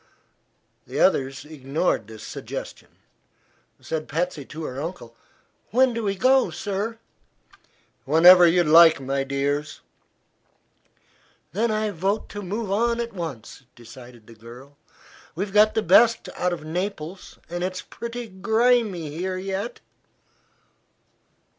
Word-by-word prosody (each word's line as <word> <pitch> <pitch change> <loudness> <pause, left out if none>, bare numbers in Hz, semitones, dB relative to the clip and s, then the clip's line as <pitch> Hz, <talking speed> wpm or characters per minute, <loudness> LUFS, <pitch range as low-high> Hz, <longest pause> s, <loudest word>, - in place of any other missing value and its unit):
The - - -4
others 135 +1 +1
ignored 150 - -2
this 110 -1 -11
suggestion. - - -8 0.9
Said 160 -1 -5
Patsy 165 -1 -2
to 160 +4 -8
her 135 -2 -5
uncle: 155 -8 -7 0.5
"When 255 +2 +3
do 230 - -3
we 200 -1 -1
go, 260 +6 +3
sir?" 210 +2 -4 1.1
"Whenever 175 +4 +8
you 175 +1 +3
like, 165 0 +7
my 135 0 -2
dears." 140 +2 -2 1.7
"Then 225 +5 0
I 215 -1 -1
vote 195 +4 -2
to 205 - -7
move 205 +2 -4
on 235 +3 +1
at 235 -2 -4
once," 160 - -7
decided 120 -1 -14
the 115 - -14
girl. 120 +5 -14 0.6
"We've 195 +3 -4
got 210 +1 +5
the 220 - +1
best 225 +6 +4
out 180 - -1
of 170 -3 -5
Naples, 180 +1 -5
and 175 +1 -4
it's 185 0 -4
pretty 235 0 -7
grimey 215 -4 +1
here 185 +4 -3
yet." 195 +4 -5
180 Hz, 120 wpm, -24 LUFS, 145-210 Hz, 1.7 s, Whenever